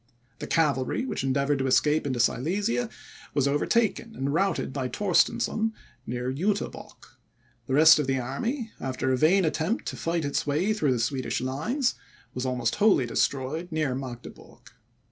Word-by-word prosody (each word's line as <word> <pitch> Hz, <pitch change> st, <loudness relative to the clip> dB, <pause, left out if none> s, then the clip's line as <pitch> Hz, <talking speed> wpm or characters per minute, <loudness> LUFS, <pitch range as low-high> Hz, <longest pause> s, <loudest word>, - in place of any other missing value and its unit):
The -, -, -5 dB
cavalry, 150 Hz, -, +1 dB
which 255 Hz, -, -3 dB
endeavoured 140 Hz, +1 st, +1 dB
to 135 Hz, -, 0 dB
escape 150 Hz, +3 st, +2 dB
into 130 Hz, -3 st, -2 dB
Silesia, 200 Hz, -, 0 dB, 0.5 s
was 140 Hz, -2 st, +2 dB
overtaken 220 Hz, +9 st, 0 dB
and 140 Hz, +1 st, -2 dB
routed 190 Hz, -5 st, 0 dB
by 130 Hz, -3 st, -2 dB
Torstensohn, 210 Hz, -, +1 dB, 0.3 s
near 125 Hz, +2 st, -3 dB
Juterbock; 195 Hz, +8 st, -4 dB, 0.5 s
the 130 Hz, -, 0 dB
rest 160 Hz, +1 st, +8 dB
of 145 Hz, -, -1 dB
the 135 Hz, 0 st, +1 dB
army, 220 Hz, -, -3 dB
after 130 Hz, 0 st, -2 dB
a -, -, +3 dB
vain 175 Hz, +7 st, +4 dB
attempt 160 Hz, +8 st, -1 dB
to -, -, -6 dB
fight 165 Hz, -2 st, -2 dB
its 140 Hz, +1 st, -1 dB
way 165 Hz, +9 st, +1 dB
through 150 Hz, -11 st, +1 dB
the -, -, -1 dB
Swedish 130 Hz, +3 st, -1 dB
lines, 185 Hz, -, -1 dB, 0.4 s
was 130 Hz, +1 st, -3 dB
almost 125 Hz, -2 st, 0 dB
wholly 205 Hz, -, +4 dB
destroyed 135 Hz, +9 st, -1 dB
near 155 Hz, -4 st, 0 dB
Magdeburg. 125 Hz, -2 st, -9 dB
145 Hz, 155 wpm, -26 LUFS, 130-195 Hz, 0.5 s, rest